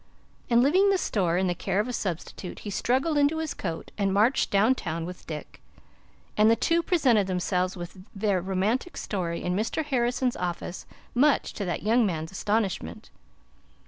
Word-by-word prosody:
And 235 0 +5
leaving 370 +9 +4
the 390 - +3
store 180 - 0
in 190 - +2
the 180 - +1
care 190 +2 -1
of 215 - +1
a 250 - -4
substitute, 180 -2 -4
he 205 - -3
struggled 270 +9 +1
into 290 +2 +3
his 320 -1 -2
coat 165 -4 -5
and 195 -1 +2
marched 215 +7 +3
down 210 +6 +4
town 165 -8 -4
with 180 +1 -9
Dick, 155 -2 -7 0.7
and 215 +1 +5
the 230 - +5
two 335 +9 +2
presented 260 - +3
themselves 185 0 -1
with 175 +2 -8 0.2
their 195 -2 +1
romantic 195 - -1
story 175 -4 -3
in 180 0 -1
Mr. 225 +9 -1
Harrison's 250 -2 0
office, 175 0 -4 0.3
much 280 +4 +3
to 200 - -4
that 175 - -3
young 230 +3 +4
man's 160 -5 -2
astonishment. 195 - -2
205 Hz, 175 wpm, -27 LUFS, 180-250 Hz, 0.7 s, And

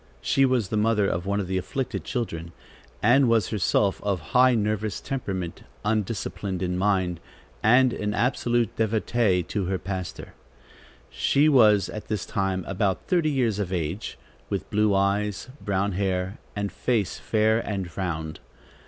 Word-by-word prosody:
She 135 - +3
was 125 -7 +1
the 110 - -1
mother 105 -1 +2
of 90 +1 -2
one 100 +1 0
of 100 - -1
the 95 +1 -1
afflicted 130 +7 -3
children, 85 -9 -4 0.5
and 125 +3 +5
was 115 -4 +2
herself 100 -1 +1
of 100 -3 -1
high 130 0 +6
nervous 110 -1 -1
temperament, 95 - -4 0.2
undisciplined 105 -3 -2
in 90 0 -1
mind, 95 -3 +1 0.4
and 125 +2 +5
an 105 0 -2
absolute 120 0 +1
devotee 110 -3 +1
to 95 +3 -3
her 95 +1 -1
pastor. 95 -1 -6 0.8
She 145 +2 +3
was 105 - +5
at 105 - -7
this 105 -2 -2
time 95 -2 -1
about 95 0 -1
thirty 170 -4 +2
years 120 -7 +1
of 95 -3 -2
age, 90 +3 -3 0.3
with - - -3
blue 105 -1 +3
eyes, 100 +3 0
brown 100 0 0
hair 95 0 -1 0.2
and 100 -1 -2
face 115 -6 -1
fair 110 0 +2
and 95 -6 -4
round. 80 -4 -3
105 Hz, 150 wpm, -25 LUFS, 95-115 Hz, 0.8 s, high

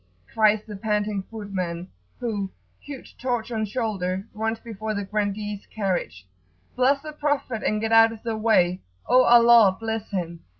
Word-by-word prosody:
cries 215 -1 +3
the 210 - -8
panting 210 0 -1
footman, 185 -5 -4 0.3
who, 205 -5 -2 0.3
huge 280 -3 -10
torch 245 -2 -2
on 220 -2 -1
shoulder, 200 -4 -2
runs 225 +1 -2
before 220 -1 -5
the 200 0 -3
grandee's 205 0 -3
carriage; 180 - -3 0.5
"Bless 265 +3 +3
the 305 -1 -7
Prophet 285 -6 -1
and 215 - 0
get 225 +1 -2
out 225 0 +7
of 225 -1 -11
the 230 -2 -2
way!" 185 -5 +2 0.2
"O 255 0 +5
Allah 235 -5 +6
bless 225 -1 -4
him!" 170 -4 -4
215 Hz, 155 wpm, -24 LUFS, 195-230 Hz, 0.5 s, out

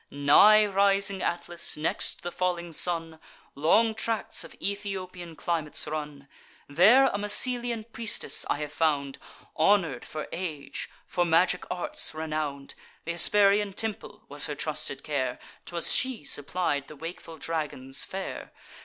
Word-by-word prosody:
Nigh 200 +10 +6
rising 200 -1 +2
Atlas, 175 -1 -2
next 150 - -1
the 175 - -4
falling 175 -2 -2
sun, 165 -1 0 0.3
Long 220 +10 +3
tracts 225 0 -1
of - - -12
Ethiopian 185 -4 -5
climates 155 0 -1
run: 150 -2 -6 0.4
There 200 - +6
a 205 -6 0
Massylian 235 +2 +2
priestess 230 0 0
I - - +1
have 150 -1 -5
found, 145 -4 0 0.4
Honour'd 165 -7 +3
for 155 - -6
age, 165 -5 -5 0.2
for 175 - 0
magic 175 +2 +2
arts 180 -3 -3
renown'd: 155 -3 -4 0.3
Th' 170 - -2
Hesperian 200 +3 +4
temple 215 0 -4
was 145 +1 -3
her 150 - -4
trusted 150 -2 -3
care; 130 -4 -2 0.3
'Twas 170 -1 -1
she 260 - +1
supplied 145 0 -1
the 155 - -11
wakeful 165 +1 -8
dragon's 145 -4 -2
fare. 190 0 -6
170 Hz, 130 wpm, -27 LUFS, 150-200 Hz, 0.4 s, Nigh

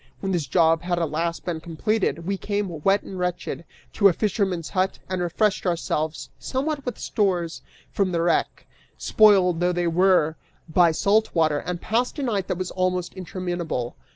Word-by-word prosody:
When 195 - -2
this 170 -6 -1
job 165 +2 +3
had 175 0 -1
at 165 -3 -1
last 170 +2 -2
been 170 -3 -2
completed, 170 +1 -1
we 195 +2 0
came, 195 -5 -3
wet 195 +1 +3
and 190 - -8
wretched, 180 -1 -3 0.3
to 200 - +5
a 190 - +4
fisherman's 190 -4 -1
hut 190 0 0
and 185 -1 -2
refreshed 195 +3 0
ourselves 160 -2 -2
somewhat 280 +1 -3
with 250 - -3
stores 180 -5 -1 0.3
from 195 -2 0
the 170 -1 0
wreck, 170 -1 0 0.3
spoiled 190 -5 +4
though 180 0 +2
they 175 0 -1
were 170 -2 +3 0.3
by 170 +1 +4
salt 205 +7 +1
water, 155 -3 +2
and 175 +2 -5
passed 245 +6 -1
a 285 - -2
night 205 -7 -1
that 185 - -2
was 185 0 -4
almost 185 -1 -1
interminable. 175 -8 -4
180 Hz, 175 wpm, -24 LUFS, 170-195 Hz, 0.3 s, to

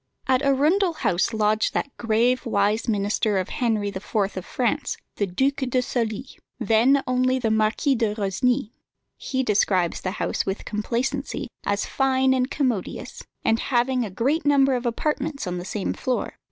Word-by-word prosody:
At 260 0 +2
Arundel 310 +7 +3
House 185 - 0
lodged 215 -1 +1
that 280 - -2
grave, 235 +2 +1
wise 210 0 +1
minister 205 -1 +1
of 185 - -1
Henry 225 -7 0
IV. 200 - -5 0.4
of 185 - -4
France, 255 +4 -1 0.2
the 205 - 0
Duc 265 +10 0
de 260 -2 0
Sully, 240 -1 -2 0.3
then 235 +5 +3
only 255 +1 +2
the 230 -4 0
Marquis 220 +6 +2
de 225 -4 0
Rosny. 225 +4 0 0.5
He 260 -1 -2
describes 190 -6 +1
the 185 - -2
house - - -1
with 195 +1 -4
complacency 245 +6 -2 0.2
as 200 0 0
fine 265 -1 +2
and 255 0 +1
commodious, 255 -11 -2 0.2
and 225 - +3
having 250 0 +1
a 215 - -4
great 270 - 0
number 275 -2 +4
of 245 -1 -1
apartments 290 +4 -2
on 180 -1 -3
the 175 - -7
same 195 0 -2
floor. 255 -1 -2
240 Hz, 160 wpm, -24 LUFS, 210-265 Hz, 0.5 s, number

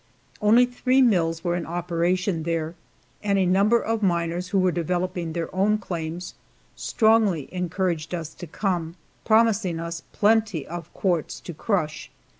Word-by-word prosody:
Only 225 +4 +6
three 250 +1 +1
mills 170 -9 +2
were 175 -1 0
in 175 - -3
operation 175 +1 0
there, 165 0 -2 0.5
and 200 -1 +1
a 190 - +3
number 200 +6 +4
of 225 0 -2
miners 170 -1 0
who 200 - 0
were 185 -1 +3
developing 175 0 -2
their 170 +1 -4
own 205 +3 +3
claims 175 -3 -5 0.4
strongly 220 - +2
encouraged 180 -2 -2
us 160 -2 -6
to 175 - -9
come, 170 -1 -2 0.3
promising 220 -6 +3
us 170 0 -5
plenty 210 -7 +2
of 170 0 -7
quartz 175 -5 -1
to 175 - -7
crush. 160 -3 -2
180 Hz, 145 wpm, -24 LUFS, 165-205 Hz, 0.5 s, Only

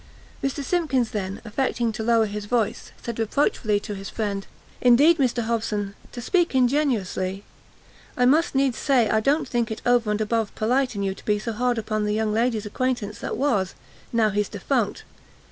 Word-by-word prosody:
Mr 275 +1 -1
Simkins 275 -8 0
then, 195 -2 -3
affecting 235 0 0
to 220 - -5
lower 225 0 +3
his 210 0 -5
voice, 225 -1 -1
said 235 -1 -5
reproachfully 220 -2 +1
to 205 0 -6
his 195 0 -7
friend 200 -3 -3 0.3
"Indeed, 285 +7 +6
Mr 245 -3 +1
Hobson, 215 -3 -2 0.2
to 240 - -7
speak 345 - +1
ingenusly, 235 -8 +1 0.7
I 250 - +4
must 300 +4 +3
needs 270 -3 +2
say 255 -6 +3
I 220 - +3
don't 280 +8 +1
think 240 -1 0
it 220 - -6
over 240 -3 +3
and 210 0 0
above 220 0 -1
pelite 250 +2 +1
in 200 - -2
you 195 -1 0
to - - -15
be 210 -1 +2
so 225 +2 -4
hard 245 +2 0
upon 215 -1 -1
the 210 0 0
young 215 -1 0
lady's 225 -1 +1
acquaintance 220 -1 -2
that - - -4
was, 215 -9 0 0.4
now 225 -2 +2
he's 205 +1 0
defunct. - - -1
225 Hz, 180 wpm, -24 LUFS, 210-250 Hz, 0.7 s, Indeed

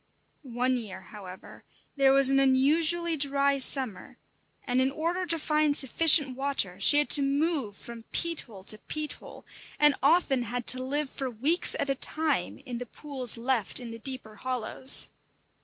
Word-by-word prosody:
One 255 -1 -2
year, 205 -6 -8
however, 190 -3 -13 0.3
there 275 -1 +3
was 270 0 +5
an 275 - +3
unusually 315 +6 +1
dry 280 -1 0
summer, 255 -7 0 0.5
and 255 -1 -1
in 260 - +1
order 340 +6 -3
to 335 - 0
find 305 -1 0
sufficient 285 0 +4
water 270 -9 -1
she 290 +9 +5
had 295 - +3
to 290 - +8
move 280 - -2
from 235 -1 -11
peat 335 -1 -1
hole 200 -6 -15
to 215 +2 -6
peat 305 +4 -5
hole, - - -14 0.3
and 295 -1 +4
often 280 -2 +2
had 240 +1 -5
to 255 - -7
live 280 +2 -2
for 265 -1 -5
weeks 275 +10 -1
at - - -1
a 275 - +1
time 290 - +1
in 245 -3 -6
the 245 - -8
pools 260 -3 -4
left 235 -3 -2
in 240 -2 -9
the 230 - -10
deeper 240 -4 -7
hollows. 255 +2 +1
270 Hz, 170 wpm, -27 LUFS, 245-295 Hz, 0.5 s, to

